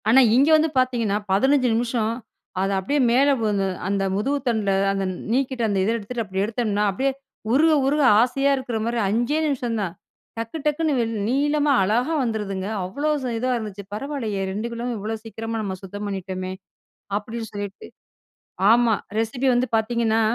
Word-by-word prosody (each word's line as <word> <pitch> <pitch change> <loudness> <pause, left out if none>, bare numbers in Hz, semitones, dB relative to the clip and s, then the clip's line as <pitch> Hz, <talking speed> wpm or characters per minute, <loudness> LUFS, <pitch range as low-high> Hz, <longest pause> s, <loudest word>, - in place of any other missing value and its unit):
ஆனா, 250 +4 +7 0.2
இங்க 275 +5 +5
வந்து 315 +1 +2
பார்த்தீங்கன்னா, 235 -5 +1
15 250 +2 +3
நிமிஷம் 230 -2 -1 0.5
அத 195 - +1
அப்படியே 280 +10 0
மேலே 275 +4 +4
வந்து 205 -3 +1 0.2
அந்த 195 0 0
முதுகு 270 +9 0
தண்டுல 220 -4 +1 0.2
அந்த 195 0 -1 0.3
நீக்கிட்டு 260 -1 0
அந்த 200 -2 0
இத 200 - +1
எடுத்துட்டு 230 +2 -4
அப்படி 190 -1 -2
எடுத்தோம்னா, 215 -2 -1
அப்படியே 270 +8 0 0.4
உருக 315 +4 +5
உருக 295 +2 +2 0.2
ஆசையா 275 +3 +2
இருக்கற 250 -3 -3
மாதிரி 235 0 -1
5 240 +9 +1 0.3
நிமிஷம் - - -1
தான். 180 -4 -3 0.4
டக்கு 230 +6 -4
டக்குன்னு 300 +1 +1
வெளி 230 -1 -1 0.2
நீளமா 290 +3 +2
அழகா 240 +10 +1
வந்துருதுங்க. 205 -5 -3 0.2
அவ்ளோ 285 +12 -2
ஸ் 260 - -3
இதா 255 +3 -1
இருந்துச்சு. 205 -3 -6
"பரவாயில்லையே 225 -4 -3
2 210 +4 -3
கிலோவும் 235 +1 -3
இவ்ளோ 215 +2 -3
சீக்கிரமா 225 0 -5
நம்ம 195 -3 -3
சுத்தம் 205 +2 -6
பண்ணிட்டோமே." 185 -1 -4 0.7
அப்படின்னு 225 +2 -5
சொல்லிட்டு 205 -1 -6 0.8
ஆமா. 235 -1 +4 0.3
ரெசிபி 245 +4 -1
வந்து 245 +1 +2
பார்த்தீங்கன்னா, 225 0 +1
230 Hz, 155 wpm, -23 LUFS, 205-260 Hz, 0.8 s, ஆனா